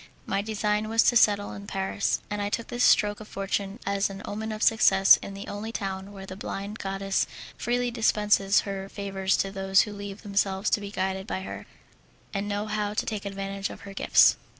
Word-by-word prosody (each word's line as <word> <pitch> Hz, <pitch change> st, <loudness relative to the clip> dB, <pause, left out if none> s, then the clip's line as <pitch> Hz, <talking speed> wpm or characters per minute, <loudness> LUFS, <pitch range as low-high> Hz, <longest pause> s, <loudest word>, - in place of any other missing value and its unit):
My 195 Hz, +1 st, 0 dB
design 210 Hz, 0 st, -1 dB
was 225 Hz, 0 st, +4 dB
to 240 Hz, -, +3 dB
settle 205 Hz, -3 st, +4 dB
in 200 Hz, 0 st, -9 dB
Paris, 195 Hz, 0 st, -1 dB
and 210 Hz, -1 st, -3 dB
I 205 Hz, -, -1 dB
took 230 Hz, +2 st, -3 dB
this 245 Hz, +1 st, 0 dB
stroke 205 Hz, 0 st, +4 dB
of 215 Hz, -, -10 dB
fortune 195 Hz, 0 st, -3 dB
as 200 Hz, 0 st, +1 dB
an 195 Hz, 0 st, -8 dB
omen 220 Hz, +2 st, -4 dB
of 215 Hz, 0 st, -3 dB
success 195 Hz, -3 st, +6 dB
in 200 Hz, -, -8 dB
the 200 Hz, -, -8 dB
only 210 Hz, +2 st, -5 dB
town 195 Hz, -2 st, -4 dB
where 195 Hz, -1 st, -9 dB
the 185 Hz, -, -8 dB
blind 200 Hz, +2 st, -5 dB
goddess 195 Hz, 0 st, -1 dB, 0.3 s
freely 245 Hz, +1 st, -1 dB
dispenses 210 Hz, -3 st, +3 dB
her 195 Hz, -1 st, -5 dB
favours 195 Hz, -1 st, -1 dB
to 195 Hz, -, -1 dB
those 195 Hz, 0 st, +3 dB
who 210 Hz, -, -3 dB
leave 200 Hz, 0 st, -8 dB
themselves 200 Hz, -1 st, 0 dB
to 210 Hz, -, +2 dB
be 200 Hz, -, -6 dB
guided 190 Hz, 0 st, -2 dB
by 190 Hz, -, -3 dB
her, -, -, -7 dB, 0.7 s
and 200 Hz, 0 st, -2 dB
know 205 Hz, +1 st, -1 dB
how 210 Hz, -1 st, -2 dB
to -, -, 0 dB
take 210 Hz, -2 st, -4 dB
advantage 195 Hz, 0 st, -4 dB
of -, -, -10 dB
her 200 Hz, -1 st, -9 dB
gifts. -, -, +5 dB
200 Hz, 205 wpm, -27 LUFS, 195-210 Hz, 0.7 s, success